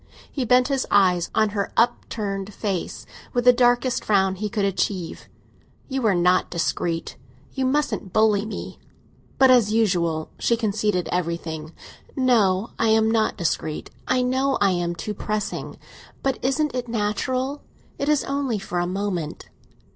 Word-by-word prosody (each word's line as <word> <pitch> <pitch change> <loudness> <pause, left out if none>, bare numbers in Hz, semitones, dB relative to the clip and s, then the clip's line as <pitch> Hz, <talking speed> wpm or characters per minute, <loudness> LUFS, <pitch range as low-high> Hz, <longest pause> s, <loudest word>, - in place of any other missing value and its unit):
He 265 -4 -2
bent 250 +2 +4
his 275 -2 -1
eyes 185 -4 +3
on 215 -1 +3
her 200 -1 -2
upturned 210 -4 -1
face, 195 -5 -3 0.3
with 245 -1 0
the 250 - +8
darkest 245 +1 +2
frown 190 -2 +2
he 210 +3 -4
could 205 -2 0
achieve. 190 -3 -2 0.6
"You 265 -4 0
are 200 - +3
not 180 +1 +3
discreet. 170 -1 -2 0.4
You 265 -1 0
mustn't 280 -8 -1
bully 215 -1 +3
me!" 220 - -7 0.6
But, 265 -1 +6
as 235 -5 +5
usual, 175 -8 +1
she 235 - +2
conceded 210 -4 0
everything. 165 -2 -3 0.4
"No, 225 -6 +2
I 225 - +2
am 220 0 +4
not 220 -1 +1
discreet; 160 -3 -2 0.2
I 255 0 +2
know 265 +2 +1
I 200 -1 +4
am 175 -1 -1
too 190 +6 -4
pressing. 210 0 -4 0.5
But 270 -2 0
isn't 295 +3 0
it 250 -1 -3
natural? 255 +5 -1 0.4
It 280 - 0
is 300 -2 +3
only 275 -5 -1
for 180 -3 -3
a 175 - 0
moment." 180 -4 -3
215 Hz, 150 wpm, -23 LUFS, 185-250 Hz, 0.6 s, the